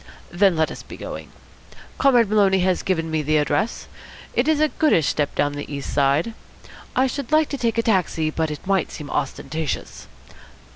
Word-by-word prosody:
Then 190 0 +3
let 160 0 +1
us - - -8
be - - -11
going. - - -7 0.7
Comrade 245 -5 +5
Maloney 195 -2 +3
has 185 0 +1
given 165 -4 -1
me 160 -1 +1
the 155 +1 +1
address. 150 +8 0 0.5
It 245 - +1
is 315 -2 +3
a 310 - +4
goodish 290 - +2
step 145 -2 -1
down 145 0 +1
on 145 - -7
the 145 - -7
East 140 -1 -5
side. 140 +9 +2 0.6
I 260 - +4
should 275 +1 -4
like 310 0 +4
to 280 - -3
take 230 -2 0
a 230 - +2
taxi, 175 -7 +1
but 160 0 -1
it 150 +3 -7
might 195 -3 +1
seem 145 -1 -8
ostentatious. 155 +2 -3
180 Hz, 190 wpm, -22 LUFS, 155-230 Hz, 0.7 s, Comrade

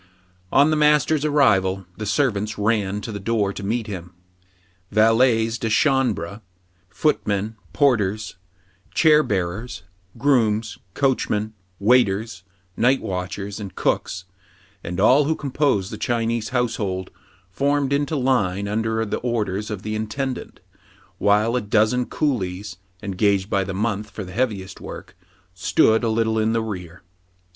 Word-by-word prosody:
On 145 +2 +5
the - - +2
master's 150 0 +3
arrival, 100 -11 +2
the 110 - -5
servants 110 -3 0
ran 105 -2 0
to 110 - -6
the 100 - -5
door 100 -1 0
to - - -7
meet 110 +3 -1
him. 90 -4 -7 0.8
Valet 115 +1 +4
s 115 +1 -4
de 115 - -1
chambrey 110 - +1 0.5
footmen, 105 -3 0 0.2
porters, 110 -7 +1 0.6
chair 155 -2 +6
bearers, 95 - -3 0.3
grooms, 115 -5 +1 0.2
coachmen, 110 -6 0 0.2
waiters, 105 -2 +2 0.3
night 130 +3 +3
watchers, 95 +2 -4
and 100 -4 -7
cooks, 90 - -1 0.6
and 90 +2 -4
all 130 +8 +5
who 160 +2 +1
compose 135 -9 0
the - - -7
Chinese 115 -1 -1
household, 110 -7 -2 0.4
formed 140 +5 +1
into 145 +2 0
line 105 -8 +1
under 110 +2 -1
the 105 - -2
orders 105 -4 -2
of 105 -2 -5
the 110 - -3
intendant; 125 +5 -4 0.6
while 105 +3 +3
a 125 - +1
dozen 110 +4 +2
coolies, 100 - -2 0.3
engaged 100 0 +1
by 100 -2 +2
the 95 - -5
month 105 0 -2
for 100 +1 -7
the 90 -1 -9
heaviest 105 -5 -2
work, - - -9 0.4
stood 110 +5 +3
a 115 - +1
little 110 0 +1
in 110 +1 +1
the 115 -1 0
rear. 90 -5 -7
110 Hz, 135 wpm, -22 LUFS, 100-125 Hz, 0.8 s, chair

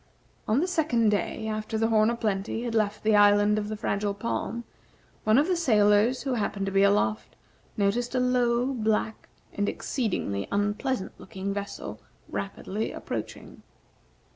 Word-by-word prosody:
On 230 +7 +3
the 360 - 0
second 300 -11 +2
day, 210 +2 -1
after 215 +1 -3
the 225 +1 +1
"Horn 215 -1 +4
o' 235 - 0
Plenty" 215 0 -2
had 240 -2 -3
left 215 -2 0
the 215 0 +4
Island 205 +1 +5
of 210 0 -4
the 215 - -4
Fragile 200 0 -1
Palm, 235 +2 -3 0.6
one 215 +2 +5
of 285 - +5
the 370 - +2
sailors 220 -5 +3
who 270 -2 -1
happened 205 -3 -1
to 195 - -2
be 195 0 +3
aloft 155 - +1 0.4
noticed 230 +5 0
a - - +3
low, 250 0 +2
black, 220 -2 -1 0.2
and 205 0 0
exceedingly 180 - -2
unpleasant 205 +2 -1
looking 195 +1 -5
vessel 200 0 -6 0.3
rapidly 200 +2 -4
approaching. - - -6
215 Hz, 155 wpm, -27 LUFS, 205-235 Hz, 0.6 s, Island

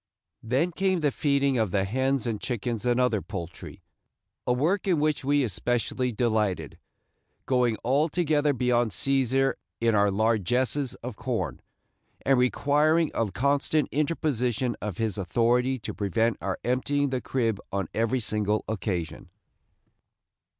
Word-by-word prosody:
Then 130 +10 0
came 190 0 0
the 145 -2 +2
feeding 140 -3 +1
of 110 -3 +1
the 95 +1 +1
hens 130 +5 0
and 110 -3 -2
chickens 120 -1 -3
and 120 0 +2
other 120 -5 +2
poultry, 85 -5 -8 0.6
a - - +3
work 165 +11 +1
in 175 -5 +3
which 150 -1 0
we 145 +1 +2
especially 120 +3 -1
delighted, 105 - -1 0.7
going 125 -4 +2
altogether 150 +2 +2
beyond 120 -2 +1
Cæsar 135 +1 +2 0.3
in 115 -1 +2
our 100 -1 +4
largesses 115 +6 0
of 120 -4 -6
corn, - - -3 0.6
and 135 -2 +4
requiring 150 +5 +2
a 115 -2 0
constant 140 +6 +1
interposition 130 -6 0
of 105 -4 -4
his 110 -3 -1
authority 120 +7 +1
to 115 - -6
prevent 110 +3 0
our 95 +1 -2
emptying 140 +3 0
the 130 -1 -1
crib 115 -6 -1
on 100 -3 -2
every 115 +3 +1
single 105 -1 0
occasion. 90 -5 -3
125 Hz, 135 wpm, -27 LUFS, 110-140 Hz, 0.7 s, our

